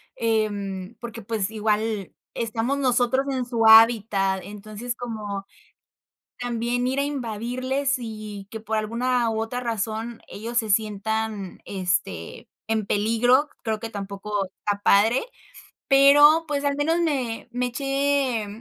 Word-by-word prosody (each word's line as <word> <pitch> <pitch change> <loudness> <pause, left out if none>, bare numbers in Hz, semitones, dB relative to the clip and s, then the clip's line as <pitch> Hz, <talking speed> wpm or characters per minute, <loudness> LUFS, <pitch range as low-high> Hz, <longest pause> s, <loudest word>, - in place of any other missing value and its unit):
em, 205 -3 -1
porque, 235 -1 -7
pues, 210 -2 -2
igual 215 -2 -1 0.2
estamos 230 +4 -1
nosotros 255 0 +2
en 260 -2 -1
su 235 -2 0
hábitat. 215 -4 +6
Entonces, 215 +4 -6
como 210 -5 -5 0.9
también 245 +1 -1
ir 265 +2 0
a - - +2
invadirles 255 +1 -2
y 235 - -5 0.3
y - - -13
que, 225 - -6
por 220 0 -2
alguna 235 +2 0
u 220 0 -1
otra 225 +2 -3
razón, 225 0 -3
ellos 230 +3 -5
se 220 -2 +1
sientan, 215 -1 -1
este, 175 - -3 0.2
en 220 -2 0
peligro, 230 +8 +3
creo 220 -2 -1
que 225 - -5
tampoco 200 0 -4
está 200 +2 -4
padre, 220 - +4 0.6
pero, 290 +4 +7
pues, 290 -1 -1
al 285 0 +1
menos 325 +4 +1
me 260 -8 -2
me 250 +1 -1
eché 275 -2 0
225 Hz, 130 wpm, -24 LUFS, 210-250 Hz, 0.9 s, pero